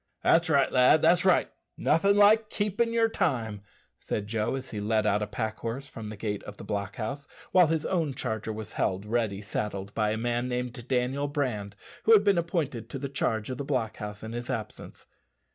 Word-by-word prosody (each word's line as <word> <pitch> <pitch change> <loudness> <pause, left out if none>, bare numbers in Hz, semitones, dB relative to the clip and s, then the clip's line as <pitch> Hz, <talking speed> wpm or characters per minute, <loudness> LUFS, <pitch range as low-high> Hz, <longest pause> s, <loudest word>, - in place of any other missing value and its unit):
"That's 170 0 +4
right, 140 -3 +3
lad, 130 +4 +5
that's 175 +2 +5
right. 185 - +3 0.3
Nothin' 195 +6 +3
like 210 +1 +5
keepin' 210 +3 0
yer 230 -1 +3
time," 115 - -1 0.4
said 105 - -3
Joe, 110 +3 -1
as 135 -1 -6
he 105 - -4
led 110 0 +1
out 105 0 +2
a 105 - -1
pack 110 +1 -3
horse 125 +5 -4
from 110 -6 -8
the 105 0 -7
gate 105 -1 -3
of 105 - -9
the - - -9
block 100 -1 -3
house, 140 +6 -5 0.2
while 180 -3 +6
his 160 -1 0
own 160 -7 0
charger 110 -1 -3
was 110 -1 -6
held 95 +1 -1
ready 105 -3 -1
saddled 100 -1 -4
by 105 -1 +1
a 110 - -1
man 120 +2 -1
named 125 -1 -4
Daniel 130 +3 0
Brand, 120 -9 -2 0.3
who 225 - +7
had 205 -2 +7
been 200 -4 +4
appointed 150 - -2
to - - -5
the 140 +1 -4
charge 115 -4 -1
of 125 - -5
the - - -2
block 130 -6 -1
house 105 0 -7
in 110 - -6
his 120 0 -5
absence. 110 -3 -6
120 Hz, 210 wpm, -28 LUFS, 105-150 Hz, 0.4 s, who